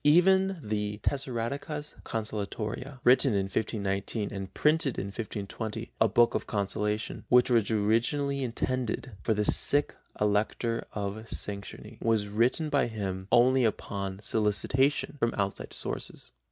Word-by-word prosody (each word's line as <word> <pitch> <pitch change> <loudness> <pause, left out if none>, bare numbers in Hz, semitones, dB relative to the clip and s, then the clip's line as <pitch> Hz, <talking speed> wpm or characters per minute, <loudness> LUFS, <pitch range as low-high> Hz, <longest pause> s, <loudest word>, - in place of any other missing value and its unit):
Even 190 +5 +5
the 105 -1 -2
Tessaradecas 140 +3 -3
consolatoria, 110 +4 -4
written 125 0 +5
in 100 - +2
1519 100 +1 -2
and 95 -1 -5
printed 150 -4 +2
in - - -2
1520, 110 +2 -5
a 110 - +6
book 120 +3 +4
of - - -2
consolation, 105 +1 -2
which 125 +1 +5
was 115 -4 +3
originally 120 +6 +1
intended 130 0 -2
for 110 - +1
the 105 0 0
sick 145 +6 +5 0.3
Elector 105 +3 0
of 105 +2 -4
Saxony, 100 -1 -6
was 110 -3 +1
written 120 +9 +1
by 140 -4 +2
him 95 -4 -4
only 125 +2 +5
upon 100 -3 -2
solicitation 115 +9 +1
from 115 -1 +1
outside 100 -1 -2
sources. - - -4
115 Hz, 125 wpm, -29 LUFS, 105-130 Hz, 0.3 s, a